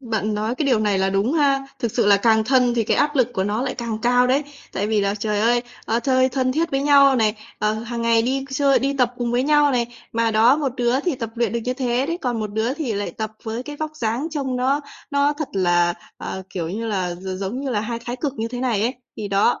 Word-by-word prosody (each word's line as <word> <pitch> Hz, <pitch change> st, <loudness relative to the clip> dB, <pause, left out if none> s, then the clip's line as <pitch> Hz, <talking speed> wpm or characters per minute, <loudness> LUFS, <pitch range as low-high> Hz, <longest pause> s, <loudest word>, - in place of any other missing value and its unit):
bạn 220 Hz, -4 st, -2 dB
nói 215 Hz, +3 st, -1 dB
cái 290 Hz, +2 st, -1 dB
điều 250 Hz, -5 st, +3 dB
này 205 Hz, -2 st, +1 dB
là 190 Hz, 0 st, +1 dB
đúng 200 Hz, +7 st, +1 dB
ha. 275 Hz, -3 st, +2 dB
Thực 235 Hz, -3 st, -2 dB
sự -, -, +1 dB
là 200 Hz, -, +6 dB
càng 220 Hz, +1 st, +3 dB
thân 250 Hz, 0 st, +3 dB
thì 230 Hz, -2 st, +1 dB
cái -, -, +1 dB
áp 295 Hz, 0 st, +1 dB
lực 250 Hz, -3 st, +3 dB
của 190 Hz, -, -1 dB
nó 210 Hz, +4 st, -1 dB
lại 265 Hz, -, -2 dB
càng 230 Hz, -3 st, -4 dB
cao 245 Hz, +1 st, +4 dB
đấy. 270 Hz, +4 st, +2 dB, 0.3 s
Tại 200 Hz, +2 st, -1 dB
vì 215 Hz, -1 st, +1 dB
là 200 Hz, 0 st, 0 dB
trời 210 Hz, 0 st, -1 dB
ơi, 240 Hz, +2 st, +3 dB, 0.2 s
ơ, 230 Hz, +2 st, +1 dB
chơi 260 Hz, +1 st, +3 dB
thân 255 Hz, 0 st, 0 dB
thiết 330 Hz, +3 st, 0 dB
với 270 Hz, 0 st, 0 dB
nhau 280 Hz, -2 st, +6 dB
này, 215 Hz, -2 st, +2 dB, 0.2 s
ờ, 210 Hz, +1 st, +1 dB
hàng 230 Hz, +1 st, -4 dB
ngày 230 Hz, -1 st, +3 dB
đi 265 Hz, +3 st, -1 dB
chơi, 275 Hz, 0 st, +3 dB
đi 275 Hz, +1 st, -1 dB
tập 250 Hz, -1 st, +2 dB
cùng 240 Hz, -1 st, -2 dB
với 245 Hz, +1 st, +2 dB
nhau 295 Hz, 0 st, +4 dB
này. 240 Hz, -2 st, +1 dB, 0.3 s
Mà 230 Hz, 0 st, +1 dB
đó, 230 Hz, +6 st, +5 dB
một 280 Hz, -5 st, -1 dB
đứa 245 Hz, +2 st, +1 dB
thì 330 Hz, -1 st, -1 dB
tập 230 Hz, -3 st, -5 dB
luyện 235 Hz, -1 st, 0 dB
được 235 Hz, -, -1 dB
như 250 Hz, 0 st, -1 dB
thế 255 Hz, 0 st, 0 dB
đấy, 335 Hz, +2 st, -2 dB
còn 240 Hz, -3 st, -1 dB
một 210 Hz, -, -3 dB
đứa 225 Hz, +5 st, 0 dB
thì 290 Hz, -8 st, -3 dB
lại 205 Hz, 0 st, -2 dB
tập 220 Hz, -1 st, -4 dB
với 225 Hz, +2 st, -4 dB
cái 295 Hz, +2 st, -8 dB
vóc 310 Hz, 0 st, -5 dB
dáng 235 Hz, +5 st, -1 dB
trông 270 Hz, -4 st, -2 dB
nó 270 Hz, +4 st, +1 dB, 0.3 s
nó 285 Hz, 0 st, +2 dB
thật 295 Hz, 0 st, -5 dB
là, 175 Hz, -2 st, +2 dB, 0.2 s
ờ, 190 Hz, -, -6 dB
kiểu 170 Hz, -3 st, -3 dB
như 225 Hz, +5 st, -4 dB
là, 185 Hz, -5 st, -1 dB
gi 185 Hz, +1 st, -6 dB
giống 200 Hz, +7 st, -4 dB
như 275 Hz, -1 st, -3 dB
là 210 Hz, -3 st, 0 dB
hai 230 Hz, +2 st, -3 dB
thái 245 Hz, +1 st, -4 dB
cực 280 Hz, +1 st, -2 dB
như 225 Hz, +1 st, -2 dB
thế 245 Hz, 0 st, -5 dB
này 235 Hz, -5 st, 0 dB
ấy. 240 Hz, +4 st, 0 dB, 0.2 s
Thì 210 Hz, -, -4 dB
đó, 200 Hz, +4 st, +2 dB
240 Hz, 270 wpm, -22 LUFS, 215-270 Hz, 0.3 s, là